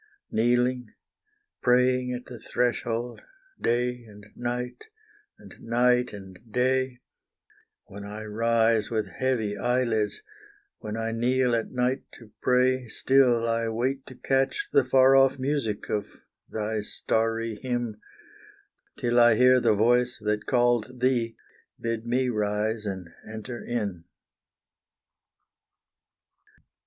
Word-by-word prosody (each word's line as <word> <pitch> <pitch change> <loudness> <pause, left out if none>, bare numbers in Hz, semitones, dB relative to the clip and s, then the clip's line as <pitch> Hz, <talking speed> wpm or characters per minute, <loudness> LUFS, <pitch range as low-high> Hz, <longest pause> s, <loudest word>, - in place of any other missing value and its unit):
Kneeling 125 +2 +1 0.7
praying 125 0 +3
at 125 0 -5
the 120 -2 -10
threshold 120 0 -2 0.4
day 125 +1 0
and 105 -1 -14
night, 125 - -4 0.5
and - - -14
night 125 +1 +2
and 95 -3 -11
day, 130 +1 0 0.8
When 100 +1 -10
I 105 +2 -7
rise 115 0 +1
with 110 -2 -1
heavy 120 -6 -1
eyelids 120 - 0 0.6
when 110 -1 -5
I 115 0 -2
kneel 125 +1 +1
at 115 - -2
night 125 +1 0
to 115 -3 -15
pray 125 0 +2
Still 125 -1 +3
I 115 0 0
wait 130 +4 -2
to 130 - -10
catch 135 +1 0
the 140 - +5
far 130 +1 +5
off 135 0 +5
music 130 -6 -2
of 105 -1 -2 0.4
the 110 0 -2
starry 115 0 -1
hymn, 120 -4 -3 1.0
Till 120 0 +2
I 120 -1 +6
hear 125 +2 +5
the 110 - +3
voice 120 +3 +2
that 105 0 -1
called 120 0 +1
thee 120 -3 +1 0.4
bid 115 0 -3
me 125 +2 +1
rise 105 0 -1
and 95 -3 -5 0.2
enter 110 +2 -7
in. 100 -8 -3
120 Hz, 115 wpm, -26 LUFS, 110-125 Hz, 1.0 s, I